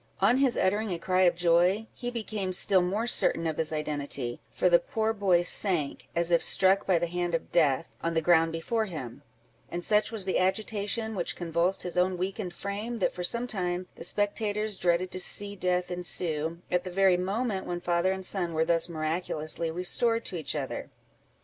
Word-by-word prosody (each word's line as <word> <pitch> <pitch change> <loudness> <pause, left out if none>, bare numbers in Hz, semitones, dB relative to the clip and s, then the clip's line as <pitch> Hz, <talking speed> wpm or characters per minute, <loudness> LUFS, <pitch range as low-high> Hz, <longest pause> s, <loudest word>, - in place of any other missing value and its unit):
On 245 - +4
his 265 -3 +2
uttering 205 +3 +1
a 175 - -2
cry 185 +2 0
of 175 -2 +4
joy, 175 +5 +3
he 245 - -5
became 215 -5 -4
still 185 +1 +3
more 195 +6 -1
certain 165 -7 +2
of 160 -2 -2
his 160 -1 -1
identity, 145 -5 -3
for - - +1
the 175 -1 +6
poor 220 +5 -1
boy 190 -5 +2
sank, 175 -5 +2
as 170 0 0
if 170 - +4
struck 195 0 +4
by 185 -3 +4
the 170 - 0
hand 175 0 -2
of 165 - -5
death, 155 -2 +2
on 165 0 -2
the - - +4
ground 165 0 +4
before 220 +8 -1
him; 145 - -7 0.5
and 175 +1 -4
such 210 +4 +2
was 215 -4 -2
the 190 - +1
agitation 210 +3 -1
which 180 -5 -3
convulsed 175 +2 0
his 180 0 -1
own 180 0 +1
weakened 185 -1 -4
frame, 210 +4 -4
that, 205 - +1
for 180 - -5
some 235 +7 0
time, 180 -5 -3
the - - -9
spectators 205 +2 -1
dreaded 175 +1 +1
to 185 - -5
see 205 +2 0
death 180 -1 -1
ensue, 170 -2 -2
at 180 0 +1
the 185 - -6
very 190 0 +3
moment 195 +2 -2
when 175 0 -3
father 175 +1 +1
and 190 0 -4
son 175 -4 -1
were 160 0 +1
thus 170 +1 +2
miraculously 160 0 -2
restored 225 +7 +1
to 185 - -3
each 155 -3 -3
other. 140 -3 -4
180 Hz, 195 wpm, -28 LUFS, 170-200 Hz, 0.5 s, the